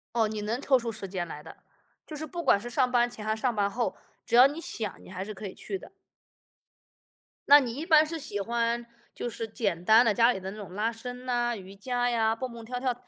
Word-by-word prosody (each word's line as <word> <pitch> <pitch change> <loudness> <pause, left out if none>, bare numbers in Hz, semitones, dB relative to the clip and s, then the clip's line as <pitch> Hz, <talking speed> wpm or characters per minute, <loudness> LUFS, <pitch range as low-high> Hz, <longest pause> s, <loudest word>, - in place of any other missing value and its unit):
哦， 225 -2 +3
你 215 -1 -4
能 230 +5 -2
抽 265 -2 +4
出 230 -1 -4
时 210 -3 -7
间 180 -2 -3
来 150 -2 -8
的， 160 - -12 0.5
就 310 - -8
是 310 +1 -5
不 340 +3 -5
管 200 - +4
是 240 - -6
上 250 +1 +1
班 240 -1 +3
前 220 -3 -9
还 215 0 +1
是 220 - -9
上 250 -3 +1
班 200 -1 +1
后， 235 +2 -2 0.3
只 - - -3
要 250 +2 +10
你 295 +4 -3
想， 215 - -5
你 - - -13
还 190 0 -5
是 215 - -6
可 205 +1 -8
以 185 - -7
去 390 - -5
的。 - - -14 1.6
那 290 +1 +9
你 240 -3 -3
一 300 +4 -3
般 310 -2 +6
是 325 +1 -4
喜 270 -9 -4
欢 235 +2 -1 0.3
就 - - -4
是 225 0 -5
简 195 -7 -2
单 225 +4 +7
的 215 - +3
家 235 +2 +5
里 190 - -5
的 190 - -5
那 - - -10
种 190 -4 -9
拉 220 +3 0
伸 250 +2 -8
啊， 240 -1 +1
瑜 190 0 -10
伽 245 +4 -1
呀， 225 -2 +2
蹦 255 +2 -5
蹦 230 -1 -9
跳 250 +2 -4
跳， 250 -1 0
235 Hz, 275 characters per minute, -28 LUFS, 210-250 Hz, 1.6 s, 要